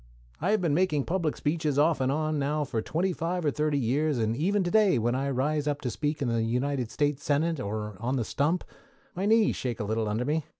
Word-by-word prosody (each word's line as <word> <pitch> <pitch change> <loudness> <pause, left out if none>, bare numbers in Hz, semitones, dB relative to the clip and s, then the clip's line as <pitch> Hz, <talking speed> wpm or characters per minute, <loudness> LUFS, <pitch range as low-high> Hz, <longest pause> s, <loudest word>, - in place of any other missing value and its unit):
I 175 - 0
have 215 -1 +2
been 165 -5 +1
making 155 -4 +1
public 170 -4 -1
speeches 150 -2 -1
off 150 -1 +3
and 130 0 +2
on 155 +1 0
now 150 +2 0
for 115 -5 -2
twenty 180 +9 -1
five 175 +1 -2
or 145 - +3
thirty 150 -1 0
years, 140 +4 +1
and 110 -1 0
even 190 +8 +1
to 175 - -2
day 210 - +4
when 120 +1 +1
I 135 +2 -1
rise 145 +3 0
up 145 -1 0
to 125 - -2
speak 150 +4 -2
in - - 0
the 115 -1 +1
United 125 +2 -1
States 145 0 -1
Senate, 155 +2 +1
or 105 -2 -4
on 125 +4 -1
the 120 -4 -1
stump, 160 +10 0 0.5
my 190 +3 -2
knees 220 0 +4
shake 120 -3 -3
a - - -1
little 110 +1 -1
under 110 +4 -1
me. 155 +3 0
145 Hz, 240 wpm, -28 LUFS, 125-160 Hz, 0.5 s, day